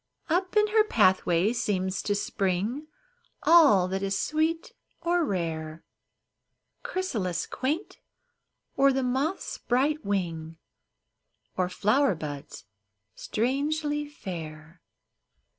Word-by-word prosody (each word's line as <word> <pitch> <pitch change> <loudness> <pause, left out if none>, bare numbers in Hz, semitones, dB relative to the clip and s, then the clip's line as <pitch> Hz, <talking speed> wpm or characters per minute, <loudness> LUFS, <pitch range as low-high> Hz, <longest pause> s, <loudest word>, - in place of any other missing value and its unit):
Up 365 +4 +1
in 425 - +6
her 435 0 +5
pathway 190 - +3
seems 190 -6 -1
to 205 - 0
spring 200 - -1 0.6
All 290 - +6
that 190 +1 -2
is 195 0 -1
sweet 320 +2 -1 0.3
or 345 +1 +1
rare, 165 - -3 0.5
— - - -53
Chrysalis 205 - -2
quaint, 300 +9 -3 0.8
or 275 0 +5
the 265 0 0
moth's 270 +8 -2
bright 280 +5 +1
wing. 165 -5 -3 1.0
Or 180 -1 0
flower 215 +5 +2
buds 145 -3 -7 0.5
strangely 295 +5 -1
fair. 165 - -8
215 Hz, 100 wpm, -27 LUFS, 180-300 Hz, 1.0 s, in